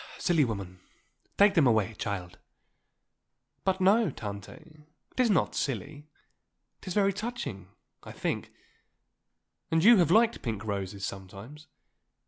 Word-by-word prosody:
"Silly 170 -4 +2
woman. 100 -6 -4 0.6
Take 200 0 +6
them 155 -7 +4
away, 110 -2 +2
child." 95 -5 -5 1.2
"But 190 0 0
no, 200 +3 +4
Tante, 100 -6 -7 0.6
it - - -13
is 250 -2 +4
not 190 -6 +2
silly; 145 +3 -4 0.7
it - - -15
is 185 - -4
very 200 -1 +3
touching, 205 - -5 0.3
I - - -10
think; - - -3 1.2
and 165 0 +2
you 235 +2 +8
have 170 -4 +3
liked 225 +5 +3
pink 110 -3 -4
roses 100 -1 -4
sometimes. 100 +11 -9
145 Hz, 125 wpm, -29 LUFS, -, 1.2 s, you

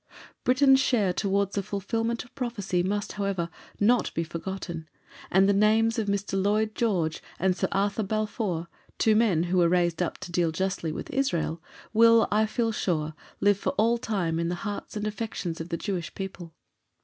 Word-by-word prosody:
Britain's 265 +1 +5
share 220 -9 +2
towards 200 +1 0
the 200 - 0
fulfilment 225 +4 -2
of 245 - -21
prophecy 225 -9 -1
must, 205 +3 -1
however, 195 -4 -2 0.3
not 230 +3 +3
be 165 - 0
forgotten, 165 -1 -6 0.4
and 190 +1 +4
the 200 - +4
names 220 +3 +3
of 215 - -1
Mr. 200 -1 -1
Lloyd 215 +2 +1
George 180 -10 0 0.2
and 185 0 +2
Sir - - 0
Arthur 200 +2 +1
Balfour, 210 -4 -2 0.3
two 220 -1 +4
men 210 -8 +3
who 180 +1 +1
were 170 -1 +4
raised 175 -1 +1
up 175 - -1
to 175 - -8
deal 170 -1 +1
justly 180 -1 -2
with - - -6
Israel, 170 - 0 0.3
will, 230 0 +6
I 215 +1 +3
feel 230 +1 0
sure, 160 -7 -1 0.3
live 205 -1 +4
for - - -1
all 230 +3 +2
time 175 -8 -1
in 170 0 0
the 175 - -1
hearts 205 +1 -5
and 210 - -3
affections 210 -6 -4
of 165 - -7
the 170 - -2
Jewish 180 -4 -4
people. 185 -4 -7
200 Hz, 180 wpm, -27 LUFS, 175-220 Hz, 0.4 s, will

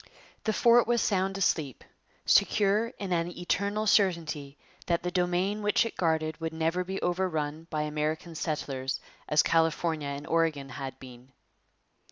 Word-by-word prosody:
The 220 - +2
fort 235 +2 +5
was 240 0 +2
sound 195 -2 0
asleep, 155 -8 0 0.4
secure 210 +2 +3
in 195 -3 -3
an 170 0 +1
eternal 200 +4 -1
certainty 165 -9 +1 0.3
that 170 -1 +1
the 180 - -2
domain 180 +3 0
which 210 +2 +2
it 230 - -5
guarded 160 -2 0
would 160 0 -3
never 165 +3 0
be 190 +2 -4
overrun 165 -3 -1
by 155 -2 -1
American 155 +2 -2
settlers 135 -4 -3 0.3
as 150 - +5
California 160 -2 +1
and 140 +1 -5
Oregon 160 -4 0
had 135 +1 -6
been. 125 0 -13
165 Hz, 145 wpm, -29 LUFS, 150-190 Hz, 0.4 s, fort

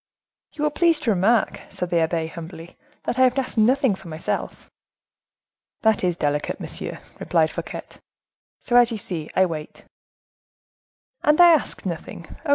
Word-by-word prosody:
"You 300 - -4
will 300 - +2
please 330 0 +3
to 235 - +1
remark," 210 +4 +2
said 180 -1 -5
the 170 - +3
abbe, 160 0 0
humbly, 165 +1 -9 0.3
"that 245 - -2
I - - +4
have 255 +1 +4
asked 255 -3 -1
nothing 255 +1 +3
for 190 -1 -10
myself." 160 0 -4 1.2
"That 220 -3 +3
is 180 -2 +1
delicate, 145 -2 -1
monsieur," - - -6 0.2
replied - - +1
Fouquet; - - -6 0.8
"so, 240 - +1
as 240 0 +5
you 225 - -2
see, 170 -6 -5
I 190 - +5
wait." 155 -3 -7 1.4
"And 300 +2 +3
I 350 -1 +9
ask 310 -9 +2
nothing, 170 -1 -6
oh! 320 - -6
195 Hz, 160 wpm, -23 LUFS, 165-255 Hz, 1.4 s, I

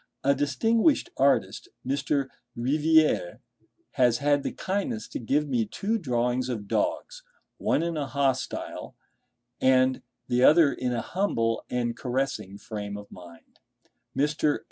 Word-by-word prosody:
A 140 - +4
distinguished 225 - +2
artist, 140 +1 +1 0.2
Mr. 140 +1 0 0.3
Riviere, 155 - +2 0.5
has 125 -3 +3
had 145 0 +2
the - - -3
kindness 205 +4 -3
to - - -5
give 145 +6 0
me 120 -5 0
two 220 - -2
drawings 125 - 0
of 110 -5 -4
dogs—one 485 - -2
in 170 -1 -2
a 145 -2 -2
hostile 135 -1 -2 0.7
and 130 0 +3 0.3
the 125 0 +2
other 155 0 +6
in 125 -1 -2
a 120 -2 -1
humble 115 - -1
and 120 -1 -1
caressing 125 -6 -3
frame 105 -2 -6
of 105 0 -11
mind. 85 -2 -14 0.6
Mr. 150 +1 +1
135 Hz, 125 wpm, -27 LUFS, 120-160 Hz, 0.7 s, other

